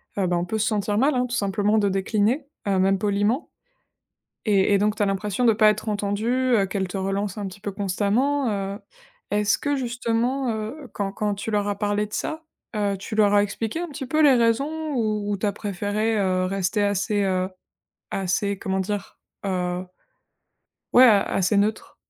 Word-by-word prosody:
Ah 195 Hz, -3 st, 0 dB
bah, 175 Hz, 0 st, +1 dB
on 175 Hz, -, -1 dB
peut 220 Hz, +4 st, -2 dB
se 215 Hz, -, +1 dB
sentir 205 Hz, -1 st, 0 dB
mal, 270 Hz, +4 st, +3 dB
hein, 250 Hz, -, +1 dB
tout 245 Hz, -, -3 dB
simplement 205 Hz, +1 st, +1 dB
de 205 Hz, -2 st, +2 dB
décliner, 210 Hz, +8 st, 0 dB, 0.2 s
heu, 195 Hz, -1 st, +2 dB
même 195 Hz, 0 st, +3 dB
poliment 205 Hz, -, 0 dB, 1.0 s
et 200 Hz, -1 st, +3 dB
et -, -, +4 dB
donc 210 Hz, +1 st, +1 dB
tu -, -, 0 dB
as -, -, +3 dB
l'impression 200 Hz, +4 st, -1 dB
de 230 Hz, -, +6 dB
pas 215 Hz, 0 st, +5 dB
être 215 Hz, +1 st, -3 dB
entendue, 205 Hz, +2 st, -1 dB, 0.3 s
heu, 195 Hz, -2 st, +2 dB
qu'elles 190 Hz, -1 st, -2 dB
te 195 Hz, -, -5 dB
relancent 195 Hz, +1 st, -2 dB
un 200 Hz, -, -3 dB
petit 190 Hz, +1 st, -9 dB
peu 200 Hz, -1 st, -4 dB
constamment. 215 Hz, +8 st, 0 dB
Heu, 200 Hz, 0 st, -3 dB, 0.5 s
est-ce 205 Hz, 0 st, +2 dB
que 285 Hz, -1 st, -1 dB
justement, 245 Hz, +1 st, -1 dB
heu, 230 Hz, +6 st, -6 dB
quand 195 Hz, -1 st, -3 dB
quand 210 Hz, -1 st, -1 dB
tu 205 Hz, +2 st, -5 dB
leur 205 Hz, -1 st, 0 dB
as 200 Hz, -1 st, -2 dB
parlé 205 Hz, 0 st, 0 dB
de 210 Hz, -, -19 dB
ça, 315 Hz, +1 st, -3 dB, 0.3 s
heu, 200 Hz, -1 st, 0 dB
tu 195 Hz, +3 st, -7 dB
leur 205 Hz, -1 st, +4 dB
as 205 Hz, -, +6 dB
expliqué 225 Hz, +9 st, -3 dB
un 350 Hz, -, -3 dB
petit 280 Hz, -2 st, -6 dB
peu 310 Hz, +4 st, +2 dB
les 280 Hz, -3 st, +7 dB
raisons 280 Hz, +7 st, +1 dB
où 210 Hz, -3 st, 0 dB
tu 215 Hz, -, -5 dB
as 200 Hz, -, +1 dB
préféré, 205 Hz, +2 st, -1 dB
heu, 185 Hz, -2 st, +1 dB
rester 195 Hz, +2 st, 0 dB
assez, 205 Hz, +1 st, +1 dB
heu, 185 Hz, -1 st, 0 dB, 0.6 s
assez 195 Hz, +1 st, -1 dB
comment 190 Hz, 0 st, -1 dB
dire? 200 Hz, +1 st, -4 dB, 0.3 s
Heu 180 Hz, -1 st, -2 dB, 1.1 s
ouais, 255 Hz, -, +8 dB
a 210 Hz, -5 st, +6 dB
assez 195 Hz, +2 st, +1 dB
neutre. 215 Hz, +2 st, 0 dB
205 Hz, 195 wpm, -24 LUFS, 195-225 Hz, 1.1 s, ouais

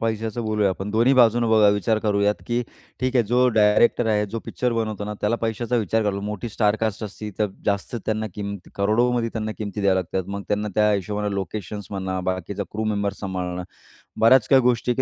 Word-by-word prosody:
पैशाचं 115 Hz, +1 st, -2 dB
बोलूया 105 Hz, -2 st, +1 dB
आपण. 95 Hz, +2 st, -4 dB
दोन्ही 115 Hz, +5 st, +3 dB
बाजूनं 120 Hz, -2 st, +4 dB
बघा 110 Hz, -2 st, +6 dB
विचार 105 Hz, +2 st, +1 dB
करूयात, 105 Hz, 0 st, +2 dB
की 120 Hz, +1 st, 0 dB, 0.4 s
ठीक 130 Hz, 0 st, 0 dB
आहे 120 Hz, -, +4 dB
जो 125 Hz, +3 st, +3 dB
डायरेक्टर 110 Hz, +1 st, +3 dB
आहे, 105 Hz, 0 st, +2 dB
जो 110 Hz, +3 st, -4 dB
पिक्चर 125 Hz, -1 st, -1 dB
बनवतो 110 Hz, -2 st, -2 dB
ना, 105 Hz, -, -4 dB
त्याला 110 Hz, +3 st, +1 dB
पैशाचा 115 Hz, +2 st, -1 dB
विचार 110 Hz, 0 st, +1 dB
करायला 105 Hz, -2 st, 0 dB
लागतो. 100 Hz, -, -5 dB
मोठी 105 Hz, +2 st, -4 dB
स्टार 105 Hz, 0 st, +1 dB
कास्ट 110 Hz, -1 st, -1 dB
असती, 105 Hz, +1 st, -7 dB
तर 105 Hz, -, +2 dB, 0.2 s
जास्त 100 Hz, +3 st, -1 dB
त्यांना 110 Hz, 0 st, -1 dB
किंमत 100 Hz, -3 st, -6 dB
करोडोमध्ये 115 Hz, +4 st, +1 dB
त्यांना 110 Hz, -1 st, -3 dB
किंमत 105 Hz, -1 st, -4 dB
द्याव्या 100 Hz, -1 st, +3 dB
लागतात. 95 Hz, +2 st, -4 dB
मग 100 Hz, -, -4 dB
त्यांना 105 Hz, +1 st, 0 dB
त्या 105 Hz, 0 st, +4 dB
हिशोबानं 105 Hz, +1 st, -2 dB
लोकेशन्स 100 Hz, +1 st, -5 dB
म्हणा, 95 Hz, -1 st, -3 dB
बाकीचा 95 Hz, +2 st, -4 dB
क्रू 110 Hz, +1 st, -2 dB
मेंबर्स 100 Hz, -2 st, -1 dB
सांभाळणं. 90 Hz, -2 st, -3 dB, 0.6 s
बऱ्याच 115 Hz, +2 st, +5 dB
काही 135 Hz, -2 st, +6 dB
गोष्टी 125 Hz, 0 st, +1 dB
आहे, 120 Hz, -, +1 dB
105 Hz, 200 wpm, -23 LUFS, 100-115 Hz, 0.6 s, बघा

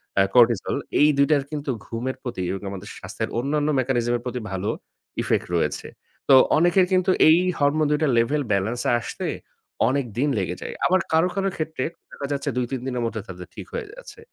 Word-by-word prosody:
অ্যা 95 Hz, 0 st, +4 dB
cortisol 120 Hz, -4 st, +4 dB, 0.2 s
এই 150 Hz, -, +7 dB
২ 140 Hz, -, +4 dB
টার 140 Hz, -2 st, +3 dB
কিন্তু 145 Hz, -2 st, -3 dB, 0.2 s
ঘুমের 125 Hz, +3 st, -3 dB
প্রতি 120 Hz, -7 st, -4 dB
এবং 95 Hz, -, -4 dB
আমাদের 100 Hz, +2 st, -8 dB
স্বাস্থ্যের 110 Hz, -, -5 dB
অন্যান্য 145 Hz, +3 st, 0 dB
মেকানিজম 120 Hz, -2 st, 0 dB
এর -, -, -11 dB
প্রতি 125 Hz, 0 st, -3 dB
ভালো 95 Hz, +3 st, -2 dB, 0.5 s
ইফেক্ট -, -, 0 dB
রয়েছে। -, -, -1 dB, 0.4 s
তো -, -, +8 dB, 0.2 s
অনেকের 175 Hz, +3 st, +4 dB
কিন্তু 185 Hz, 0 st, +3 dB, 0.2 s
এই 160 Hz, -, +7 dB, 0.2 s
হরমোন 145 Hz, +2 st, +2 dB
২ 150 Hz, -, +1 dB
টা -, -, +3 dB
লেভেল 145 Hz, +6 st, +2 dB
বেলেন্স 110 Hz, +5 st, -1 dB
এ -, -, +3 dB
আসতে -, -, -5 dB, 0.6 s
অনেক 140 Hz, -1 st, 0 dB
দিন 145 Hz, +3 st, +2 dB
লেগে 90 Hz, -2 st, -1 dB
যায়। -, -, -5 dB
আবার 185 Hz, +1 st, +4 dB
কারো, 160 Hz, +3 st, +4 dB
কারো 195 Hz, 0 st, +1 dB
ক্ষেত্রে 155 Hz, -4 st, -3 dB, 0.3 s
দেখা 140 Hz, -, -6 dB
যাচ্ছে 145 Hz, +1 st, -1 dB
২, 125 Hz, -, +1 dB
৩ 130 Hz, -2 st, -3 dB
দিনের 125 Hz, -2 st, -2 dB
মধ্যে 110 Hz, -2 st, -3 dB
তাদের 90 Hz, -1 st, -9 dB
ঠিক -, -, -7 dB
হয়ে 475 Hz, -3 st, -4 dB
যাচ্ছে। 460 Hz, -3 st, -12 dB
135 Hz, 195 wpm, -23 LUFS, 115-155 Hz, 0.6 s, তো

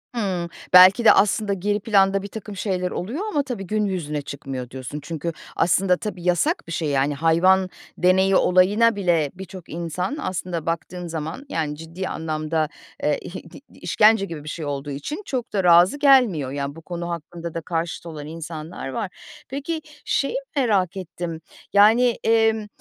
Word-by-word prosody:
Hımm. 185 Hz, -6 st, -2 dB, 0.2 s
Belki 185 Hz, +6 st, +8 dB
de -, -, +10 dB
aslında 205 Hz, 0 st, +3 dB
geri 205 Hz, +2 st, -1 dB
planda 195 Hz, -2 st, +3 dB
birtakım 205 Hz, 0 st, -8 dB
şeyler 185 Hz, -2 st, -2 dB
oluyor 240 Hz, -, -4 dB
ama 290 Hz, -1 st, +1 dB
tabii 225 Hz, -9 st, -5 dB
gün 215 Hz, -1 st, 0 dB
yüzüne 155 Hz, -6 st, -3 dB
çıkmıyor, 135 Hz, -3 st, -6 dB
diyorsun. 130 Hz, +3 st, -6 dB
Çünkü 165 Hz, +1 st, -4 dB, 0.2 s
aslında 180 Hz, +1 st, +3 dB
tabii, 180 Hz, -4 st, -6 dB
yasak 295 Hz, -, +1 dB
bir -, -, -8 dB
şey. 160 Hz, -2 st, -1 dB
Yani, 140 Hz, +1 st, +1 dB
hayvan 185 Hz, +5 st, +3 dB, 0.3 s
deneyi 190 Hz, +1 st, +3 dB
olayına 205 Hz, +5 st, +4 dB
bile 170 Hz, -7 st, +1 dB
birçok 185 Hz, -2 st, -10 dB
insan 175 Hz, -, -3 dB
aslında 180 Hz, -, -3 dB
baktığın 170 Hz, +1 st, -4 dB
zaman, 160 Hz, -, -5 dB
yani, 155 Hz, -2 st, -2 dB
ciddi 165 Hz, +4 st, -6 dB
anlamda, 155 Hz, -1 st, -2 dB, 0.3 s
eee, -, -, +2 dB
ih -, -, -9 dB, 0.2 s
di -, -, -11 dB, 0.2 s
işkence 215 Hz, -1 st, +4 dB
gibi 160 Hz, -6 st, -7 dB
bir 155 Hz, -, -7 dB
şey 160 Hz, -3 st, -5 dB
olduğu 145 Hz, 0 st, -4 dB
için 220 Hz, -, -5 dB
çok 250 Hz, -7 st, -4 dB
da 195 Hz, -3 st, +1 dB
razı 175 Hz, +7 st, +6 dB
gelmiyor. 235 Hz, -, +4 dB
Ya, 140 Hz, 0 st, -4 dB
bu 165 Hz, -, -11 dB
konu 175 Hz, +1 st, -5 dB
hakkında 170 Hz, 0 st, -6 dB
da 165 Hz, -, -3 dB
karşıt 165 Hz, +1 st, -3 dB
olan 150 Hz, -3 st, -7 dB
insanlar 160 Hz, -2 st, -7 dB
var. 200 Hz, -, -3 dB, 0.4 s
Peki, 295 Hz, +4 st, -4 dB, 0.2 s
şeyi 275 Hz, -, 0 dB, 0.2 s
merak 200 Hz, -, +1 dB
ettim, 170 Hz, -2 st, -6 dB, 0.3 s
yani, 225 Hz, +4 st, +5 dB
emm, 225 Hz, -1 st, +2 dB
180 Hz, 165 wpm, -23 LUFS, 160-205 Hz, 0.4 s, de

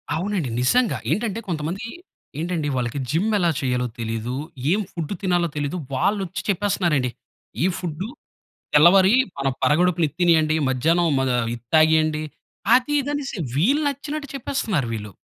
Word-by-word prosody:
అవునండి 175 Hz, -5 st, -2 dB
నిజంగా. 235 Hz, -, +2 dB
ఏంటంటే 220 Hz, 0 st, -1 dB
కొంతమంది 170 Hz, +7 st, -3 dB, 0.5 s
ఏంటండి 165 Hz, -3 st, -2 dB
వాళ్ళకి 125 Hz, +2 st, -2 dB
జిమ్ 190 Hz, +8 st, +1 dB
ఎలా 175 Hz, -3 st, +2 dB
చేయాలో 125 Hz, -2 st, 0 dB
తెలీదు. 115 Hz, +2 st, -3 dB, 0.4 s
ఏం 205 Hz, -, +3 dB
ఫుడ్ 165 Hz, +1 st, -4 dB
తినాలో 175 Hz, -2 st, +2 dB
తెలీదు. 145 Hz, +3 st, -2 dB, 0.2 s
వాళ్ళచ్చి 190 Hz, +6 st, -1 dB
చెప్పేస్తున్నారండి. 175 Hz, -9 st, +1 dB, 0.5 s
ఈ -, -, +4 dB
ఫుడ్ 175 Hz, 0 st, -4 dB, 0.7 s
తెల్లవారి 185 Hz, +7 st, +7 dB, 0.2 s
మన 135 Hz, 0 st, 0 dB
పరగడుపున 170 Hz, +2 st, +3 dB
ఇది 145 Hz, -, -20 dB
తినేయండి. 160 Hz, -3 st, +4 dB
మధ్యాహ్నం 165 Hz, +7 st, +2 dB
మగ 130 Hz, -1 st, 0 dB, 0.2 s
ఇది 120 Hz, -, -10 dB
తాగేయండి. 155 Hz, -1 st, +4 dB, 0.5 s
అది 255 Hz, +4 st, +2 dB
ఇది 285 Hz, +1 st, -4 dB
అనేసి 275 Hz, -6 st, -4 dB, 0.2 s
వీళ్ళు 250 Hz, -, +2 dB
నచ్చినట్టు 285 Hz, +1 st, -5 dB
చెప్పేస్తున్నారు 220 Hz, -, -1 dB
వీళ్ళు. 105 Hz, -2 st, -5 dB
170 Hz, 135 wpm, -23 LUFS, 145-200 Hz, 0.7 s, తెల్లవారి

